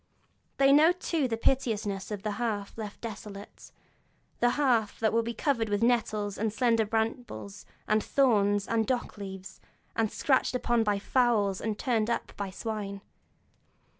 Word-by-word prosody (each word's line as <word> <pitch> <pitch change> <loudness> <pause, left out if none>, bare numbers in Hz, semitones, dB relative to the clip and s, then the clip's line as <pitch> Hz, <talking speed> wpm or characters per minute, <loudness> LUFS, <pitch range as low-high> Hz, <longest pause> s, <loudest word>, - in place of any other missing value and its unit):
They 275 0 +5
know 310 +5 +6
too 330 -5 -1
the 225 -2 -2
piteousness 215 -6 0
of 205 -2 -5
the 215 - -1
hearth 205 -4 -2
left 215 -2 -7
desolate, 210 -3 -9 0.7
the 240 - +4
hearth 240 -7 +2
that 220 -1 +1
will 230 - +3
be 235 0 -4
covered 230 -5 0
with 205 +2 0
nettles, 215 -4 +1
and 220 0 0
slender 230 -1 +2
brambles, 220 -2 -3 0.2
and 215 0 +2
thorns, 205 -7 +2
and 225 -1 +1
dock 245 -4 -2
leaves, 190 -1 -8 0.3
and 225 -2 +1
scratched 260 -2 +1
up 240 -2 +1
by 210 -2 +1
fowls, 210 -3 +1
and 220 -2 -2
turned 230 -3 0
up 235 - -2
by 200 -1 -4
swine. 200 -1 -5
220 Hz, 155 wpm, -29 LUFS, 205-240 Hz, 0.7 s, know